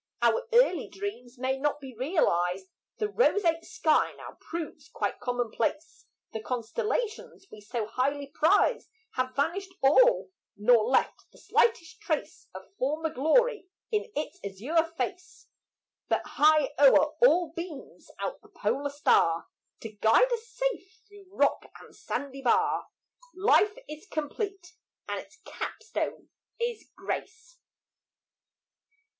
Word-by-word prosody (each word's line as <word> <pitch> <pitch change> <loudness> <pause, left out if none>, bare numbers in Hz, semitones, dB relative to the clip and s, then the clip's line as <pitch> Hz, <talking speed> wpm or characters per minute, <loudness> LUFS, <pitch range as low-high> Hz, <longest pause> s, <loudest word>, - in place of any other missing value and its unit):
Our 480 +1 +3
early 485 +2 +4
dreams 270 -12 -7
may 260 +1 -1
not 295 +1 0
be 265 -3 -9
realized; 190 - +1 0.3
The 425 - 0
roseate 385 -7 +2
sky 310 -2 +1
now - - -11
proves 320 -2 -6
quite - - -3
commonplace; 245 +5 -2 0.3
The 220 - -3
constellations 425 - -3
we 215 - -11
so 225 +1 -3
highly 275 +6 -1
prized 335 - +2 0.2
Have 255 0 -2
vanished 370 +7 -1
all - - +5 0.3
nor 215 +1 +5
left 255 +3 +1
the - - -20
slightest 340 -8 +1
trace - - -3
Of - - -11
former 305 +4 -1
glory 420 - +2 0.2
in 430 0 -1
its 300 - -4
azure 280 - 0
face, 375 0 -5 0.6
But - - +1
high 305 -2 +4
o'er 290 +2 +6
all 350 -9 +5
beams 335 -4 -8
out - - -4
the - - -20
polar 285 +1 -1
star 170 - +2 0.3
To 225 - -7
guide 220 - +4
us 465 -1 -4
safe 455 -4 -3
through 410 -2 -16
rock 395 - 0
and - - -16
sandy 275 -1 -5
bar; 250 - +2 0.5
Life 415 +2 +3
is 305 0 -9
complete 345 +3 -4 0.3
and - - -2
its - - -13
cap - - -6
stone - - -4 0.3
is 470 -1 -3
grace. 455 +4 -6
315 Hz, 125 wpm, -28 LUFS, 260-410 Hz, 0.6 s, o'er